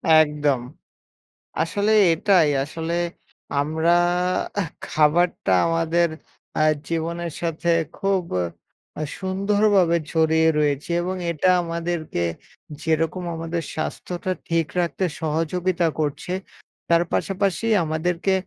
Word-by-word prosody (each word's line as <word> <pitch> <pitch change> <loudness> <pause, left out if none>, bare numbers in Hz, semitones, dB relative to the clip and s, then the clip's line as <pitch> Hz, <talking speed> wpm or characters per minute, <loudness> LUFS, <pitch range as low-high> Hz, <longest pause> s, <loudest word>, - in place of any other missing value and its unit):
একদম। 150 -4 +3 1.0
আসলে 205 +1 0 0.2
এটাই 170 -2 +4
আসলে 160 +3 -4 0.7
আমরা 160 +3 +1 0.7
এহ 165 - -3 0.2
খাবারটা 155 - +2 0.2
আমাদের 165 +1 +2 0.5
অ্যা - - +2 0.3
জীবনের 170 0 -2
সাথে 170 0 -2 0.3
খুব 195 -2 +1 0.8
আ - - -2 0.2
সুন্দরভাবে 195 -2 +2
জড়িয়ে 160 0 +3
রয়েছে 145 +1 0
এবং 185 +2 -2 0.2
এটা 170 +3 +1
আমাদেরকে 165 - -3 0.6
যেরকম 165 +3 0
আমাদের 165 +1 -3
স্বাস্থ্যটা 175 +3 -4 0.2
ঠিক 165 -2 +1
রাখতে 175 +2 -1 0.2
সহযোগিতা 165 +3 0
করছে, 150 +4 -2 0.6
তার 170 0 +5
পাশাপাশি 195 +2 0 0.2
আমাদেরকে 165 +4 0
165 Hz, 95 wpm, -23 LUFS, 160-180 Hz, 1.0 s, তার